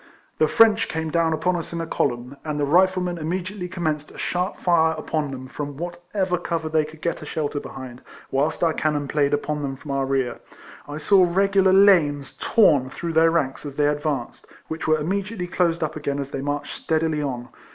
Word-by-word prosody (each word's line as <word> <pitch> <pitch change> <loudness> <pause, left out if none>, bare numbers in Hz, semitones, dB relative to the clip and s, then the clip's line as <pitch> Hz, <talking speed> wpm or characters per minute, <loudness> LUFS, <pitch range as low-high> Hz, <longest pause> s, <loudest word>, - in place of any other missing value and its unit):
The 155 - +4
French 225 +4 +5
came 160 -1 -3
down 165 0 +2
upon 160 +3 +1
us 170 - -4
in 170 - -3
a 165 - -2
column, 125 -4 -2
and 150 -1 -3
the 145 - +2
Riflemen 180 +2 +2
immediately 180 +4 -3
com 175 -1 -6
menced 150 -1 -1
a - - -14
sharp 180 +3 -2
fire 160 -2 +3
upon 155 -1 -2
them 130 -1 -7
from 145 +1 -6
what 175 +2 -6
ever 185 -3 +1
cover 165 -2 -2
they 155 -1 +2
could 155 +1 -13
get 170 - -1
a - - -7
shelter 150 -2 -2
behind, 130 -3 -9 0.3
whilst 145 +5 0
our 165 -1 +3
cannon 150 -2 -1
played 145 -1 +1
upon 145 +1 -1
them 135 -1 -3
from 140 +1 -8
our 135 -1 0
rear. 135 -3 -1 0.5
I 145 0 -6
saw 190 +4 +5
regular 195 +1 +3
lanes 150 -9 +4
torn 145 - +4
through 165 +4 -5
their 165 +1 +5
ranks 145 -5 -1
as 145 -2 -7
they 145 - +2
advanced, 145 -3 -2 0.2
which 160 +1 -4
were 155 0 +4
immedi 195 +8 -2
ately 180 -1 -4
closed 170 -2 +1
up 155 0 -3
again 145 -2 -2
as 140 -1 -4
they 135 - -3
marched 145 +1 -3
steadily 160 -1 0
on. 125 -3 -4
155 Hz, 210 wpm, -23 LUFS, 145-175 Hz, 0.5 s, French